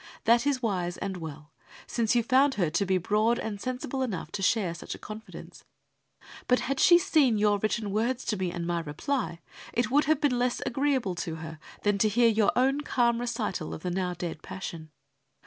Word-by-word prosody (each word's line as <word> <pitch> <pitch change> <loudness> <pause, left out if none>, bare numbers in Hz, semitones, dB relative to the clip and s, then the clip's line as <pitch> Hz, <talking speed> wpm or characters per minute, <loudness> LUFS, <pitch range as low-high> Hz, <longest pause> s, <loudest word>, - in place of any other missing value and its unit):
That 235 +4 +4
is 265 -3 0
wise 180 -5 -1
and 195 -1 -4
well, 155 -2 -8 0.3
since 230 0 0
you 235 - +3
found 265 +3 +3
her 175 -6 0
to 200 +4 +1
be 190 0 +3
broad 215 +6 +2
and 205 -2 -5
sensible 255 +1 -3
enough 210 -10 -3
to 205 - -4
share 195 -3 +2
such 170 - -7
a - - -10
confidence. 215 +1 -10 0.8
But 250 - +3
had 275 0 -2
she 345 - +7
seen 310 - +3
your 205 -1 +3
written 215 0 -1
words 235 +5 -1
to 215 - 0
me 185 -3 -2
and 170 -1 -4
my 170 0 0
reply, 170 - -3 0.3
it 240 +1 0
would 290 +2 +4
have 310 0 +2
been 265 -5 +1
less 245 0 0
agreeable 265 -6 0
to 165 -1 -3
her 160 0 -8 0.2
than 205 -1 +2
to 215 - +4
hear 235 +2 +4
your 215 -2 +3
own 270 +3 +2
calm 240 -4 +1
recital 215 -8 -3
of - - -11
the 180 - -2
now 180 0 -1
dead 170 -2 -5
passion. 165 -4 -7
215 Hz, 200 wpm, -28 LUFS, 180-250 Hz, 0.8 s, she